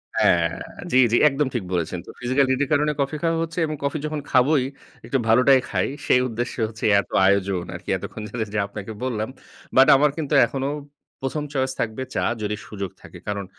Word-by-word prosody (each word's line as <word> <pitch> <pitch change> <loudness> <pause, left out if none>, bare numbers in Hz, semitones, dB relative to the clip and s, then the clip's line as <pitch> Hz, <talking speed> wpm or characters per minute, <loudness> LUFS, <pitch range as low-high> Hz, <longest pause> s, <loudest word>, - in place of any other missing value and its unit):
হ্যাঁ, 85 -1 +4 0.4
জি, 130 - +4
জি। - - +4
একদম 140 0 0
ঠিক 120 - -1
বলেছেন। 85 0 -1
তো - - -13
physical 130 +3 +2
need 130 0 +1
এর - - -2
কারণে 150 +1 +3
কফি 140 +3 -1
খাওয়া 165 -1 +2
হচ্ছে 165 +2 -5
এবং 155 -1 -3
কফি 140 +2 -1
যখন 155 -1 -3
খাবোই 130 +2 +4 0.4
একটু 135 - 0
ভালোটাই 130 +4 +6
খাই। - - 0 0.2
সেই 125 - +5
উদ্দেশ্যে 120 +1 -4
হচ্ছে 110 0 -6
এত - - -5 0.2
আয়োজন 95 -2 +2
আরকি। - - -9
এতক্ষণ - - -7
ধরে 110 +1 -3
যে, - - -1
আপনাকে 100 +1 -7
বললাম। 110 -3 -2 0.5
But 130 +1 +7
আমার 145 +2 +4
কিন্তু 155 -2 -3
এখনো 135 +2 -3 0.5
১ম 135 +3 -2
choice 130 -1 0
থাকবে 115 +3 -2
চা, - - +1 0.2
যদি 105 0 -1
সুযোগ 100 -3 -5
থাকে। - - -12
কারণ 100 -1 -2
130 Hz, 195 wpm, -23 LUFS, 105-140 Hz, 0.5 s, But